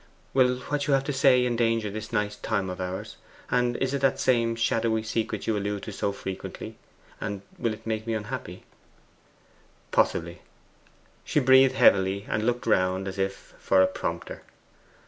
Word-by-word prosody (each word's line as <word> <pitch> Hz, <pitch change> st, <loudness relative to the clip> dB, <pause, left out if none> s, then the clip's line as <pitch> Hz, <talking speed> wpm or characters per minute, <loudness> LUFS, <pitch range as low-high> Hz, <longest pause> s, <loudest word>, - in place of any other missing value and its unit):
'Will 125 Hz, -1 st, +4 dB
what 145 Hz, +2 st, -2 dB
you 140 Hz, -, +4 dB
have 135 Hz, -, +1 dB
to 145 Hz, -, -3 dB
say 130 Hz, -2 st, +4 dB
endanger 115 Hz, -3 st, +1 dB
this 110 Hz, +1 st, -6 dB
nice 105 Hz, -2 st, -1 dB
time 100 Hz, -3 st, -2 dB
of 90 Hz, +1 st, -6 dB
ours, 90 Hz, +1 st, -5 dB, 0.3 s
and 125 Hz, -1 st, +1 dB
is 135 Hz, 0 st, -1 dB
it 140 Hz, -, -1 dB
that 135 Hz, 0 st, +2 dB
same 115 Hz, -3 st, +2 dB
shadowy 115 Hz, -1 st, +1 dB
secret 110 Hz, -1 st, -2 dB
you 110 Hz, -, +1 dB
allude 105 Hz, 0 st, -2 dB
to 110 Hz, -, -6 dB
so 100 Hz, 0 st, -1 dB
frequently, 95 Hz, -1 st, -7 dB, 0.4 s
and 100 Hz, -2 st, -4 dB, 0.2 s
will 115 Hz, -2 st, 0 dB
it 110 Hz, -, -9 dB
make 110 Hz, 0 st, -3 dB
me 115 Hz, -, 0 dB
unhappy?' 105 Hz, -1 st, -6 dB, 1.3 s
'Possibly.' 85 Hz, +1 st, +1 dB, 0.8 s
She -, -, +1 dB
breathed 130 Hz, 0 st, +6 dB
heavily, 100 Hz, -3 st, +4 dB
and 110 Hz, +1 st, -1 dB
looked 120 Hz, 0 st, 0 dB
around 95 Hz, +1 st, +1 dB
as 95 Hz, +1 st, -6 dB
if 95 Hz, 0 st, -3 dB
for 95 Hz, -1 st, +4 dB
a -, -, +4 dB
prompter. -, -, -5 dB
110 Hz, 165 wpm, -26 LUFS, 100-125 Hz, 1.3 s, breathed